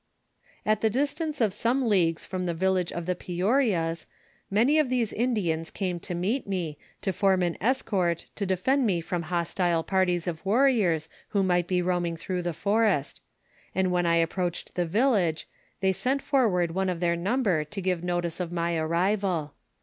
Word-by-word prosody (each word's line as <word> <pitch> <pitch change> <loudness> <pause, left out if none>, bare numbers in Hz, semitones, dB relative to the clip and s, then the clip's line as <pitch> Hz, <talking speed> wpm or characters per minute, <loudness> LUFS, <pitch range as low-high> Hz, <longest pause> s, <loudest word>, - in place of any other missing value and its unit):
"At 215 0 +2
the 220 - +3
distance 290 +4 -1
of 210 -4 +2
some 240 +4 +1
leagues 170 -6 +2
from 185 -1 -3
the 170 - -1
village 185 0 +1
of 170 -1 -4
the 180 - +1
Peouariast 180 - 0 0.4
many 240 +10 +3
of 300 -4 +2
these 245 -4 0
Indians 190 -9 0
came 180 -3 -3
to 175 - -5
meet 205 +10 -1
me, 170 -6 -3 0.2
to 190 - 0
form 190 0 +2
an 175 -1 0
escort 190 -8 0
to 200 - -3
defend 240 +8 +2
me 180 -4 +1
from 175 +1 -3
hostile 170 0 0
par 190 +1 +2
ties 175 -1 0
of 160 -2 -4
warriors 200 - +2 0.2
who 200 -2 +1
might 175 -2 +2
be 180 -1 +1
roaming 175 -2 0
through 180 +2 -3
the 175 0 -2
forest; 200 -4 +1 0.5
and 185 -1 +1
when 175 -1 +1
I 170 0 +3
ap 165 -1 +1
proached 180 -2 -3
the 175 -2 -1
village, 200 - +1 0.3
they 190 0 +3
sent 265 +7 -1
forward 190 - +2
one 190 +2 0
of 175 -2 -2
their 170 -1 +1
number 190 -2 +1
to 160 +7 -7
give 180 -2 -1
notice 175 -1 -2
of 175 -2 -3
my 170 0 -1
arrival. 170 -1 0
185 Hz, 180 wpm, -27 LUFS, 170-210 Hz, 0.5 s, the